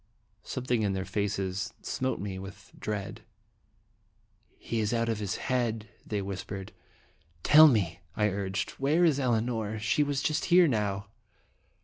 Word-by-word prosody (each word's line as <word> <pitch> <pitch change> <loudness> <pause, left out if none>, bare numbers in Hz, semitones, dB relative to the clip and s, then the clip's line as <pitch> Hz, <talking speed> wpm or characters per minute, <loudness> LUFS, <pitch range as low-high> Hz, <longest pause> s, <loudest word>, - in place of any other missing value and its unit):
Something 125 -3 -1
in 100 -2 +1
their 95 0 -2
faces 100 -2 -2
smote 130 0 -2
me 95 -1 -4
with 95 0 -11
dread. 105 -1 -4 1.4
"He 115 - -3
is 110 +2 0
out 115 0 0
of 110 -2 -1
his 100 -3 -2
head!" 115 -4 -1
they 105 -2 -3
whispered. 95 0 -6 0.4
" 85 -2 -36
Tell 155 +1 +11
me," 100 - +1 0.2
I 105 -1 +3
urged, 100 -1 -2
"where 155 +6 +4
is 150 -4 +3
Elinor? 115 -3 0
She 105 +7 +1
was 145 -1 0 0.2
here 180 0 +6
just 155 - +2
now." 100 -3 -1
105 Hz, 145 wpm, -29 LUFS, 100-125 Hz, 1.4 s, Tell